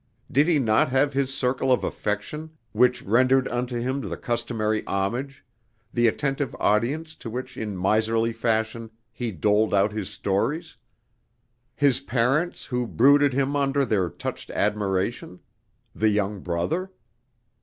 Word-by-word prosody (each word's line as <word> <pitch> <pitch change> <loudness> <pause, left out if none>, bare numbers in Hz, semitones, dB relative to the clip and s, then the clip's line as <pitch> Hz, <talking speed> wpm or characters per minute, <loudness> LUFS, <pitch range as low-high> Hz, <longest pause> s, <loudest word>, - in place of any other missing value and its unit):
Did 145 +4 +4
he 170 -3 +4
not 110 -3 +3
have 135 +2 +2
his 135 -1 0
circle 130 0 0
of 125 - +3
affection 150 +10 -4
which 125 +3 +2
rendered 130 +5 +3
unto 120 0 -2
him 130 +3 -2
the - - -5
customary 110 -2 -1
homage 125 +9 -2 0.5
the 120 -1 +3
attentive 135 +2 -1
audience 140 +10 0
to 115 - -7
which 125 +2 -6
in 105 -3 -4
miserly 110 +4 +1
fashion 115 0 -1 0.2
he 120 0 -4
doled 105 +4 +2
out 100 +1 +3
his 105 -2 -4
stories 110 - -2 1.0
his 135 -3 +3
parents 135 +6 0
who 125 -2 -2
brooded 140 +3 +4
him 140 +2 0
under 140 0 +1
their 95 -7 +1
touched - - -6
admiration 100 -2 -1 0.5
the 110 - +2
young 105 -1 0
brother?... 95 - -2
120 Hz, 135 wpm, -25 LUFS, 105-135 Hz, 1.0 s, Did